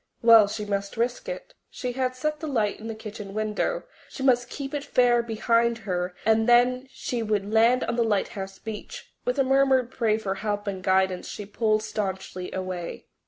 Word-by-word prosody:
Well, 225 -3 +8
she 210 +1 -4
must 200 0 -3
risk 245 - -1
it. - - -7 0.2
She 250 - -4
had 255 0 -1
set 300 +4 -2
the 315 - -5
light 220 -8 0
in 220 - -7
the 225 - -4
kitchen 210 -2 -8
window; 215 - -1 0.3
she 265 - -7
must 245 -2 +3
keep 275 +1 -6
it 290 -1 -2
fair 245 -4 +3
behind 235 +1 +1
her 180 -2 -2
and 220 +1 +3
then 250 +2 +4
she 250 -2 -4
would 210 -1 -1
land 235 +3 +4
on 235 - -2
the 235 - +3
lighthouse 195 -2 -2
beach. 225 - -8
With 250 - 0
a 275 - +4
murmured 265 -2 +3
prayer 220 -4 +1
for 200 -3 -2
help 205 +1 -3
and 195 -2 -3
guidance 190 0 +1
she 205 - -6
pulled 215 +1 +1
staunchly 190 -4 -4
away. 185 -2 -5
225 Hz, 190 wpm, -26 LUFS, 205-250 Hz, 0.3 s, Well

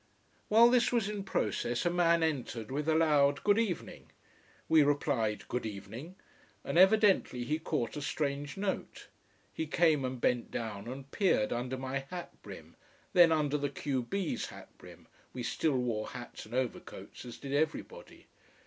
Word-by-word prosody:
While 230 +3 +6
this 245 -1 +3
was 235 -5 +1
in 210 -1 -4
process 120 - -1
a 175 - +2
man 170 -1 +3
entered 125 -7 -2
with 150 +3 -1
a 160 - +3
loud 145 -3 +3
Good 205 +1 +4
evening. 210 -7 -3 0.6
We 160 -1 +6
replied 140 -8 0
Good 125 - -2
evening 110 - -7 0.5
and - - -4
evidently 190 - +4
he 150 +6 -1
caught 150 -7 -2
a 150 - -4
strange 140 +1 -3
note. 195 -1 -4 0.4
He 160 - -3
came 155 -3 +3
and 130 -1 -3
bent 120 0 +1
down 110 -2 -5
and 135 +2 -8
peered 185 - +2
under 125 +2 -3
my 130 +1 -3
hat 180 -1 -6
brim, - - -11 0.4
then 175 -2 +7
under 150 -2 +1
the 145 0 -1
q 135 -1 -2
b's 185 +8 -2
hat - - -13
brim, - - -14 0.3
we 125 - -5
still 145 +3 0
wore 115 -4 -1
hats 120 -3 -9
and 115 - -7
overcoats, 130 -2 -4
as 120 -2 -9
did 140 0 -6
everybody. 160 - -3
145 Hz, 165 wpm, -31 LUFS, 125-170 Hz, 0.6 s, then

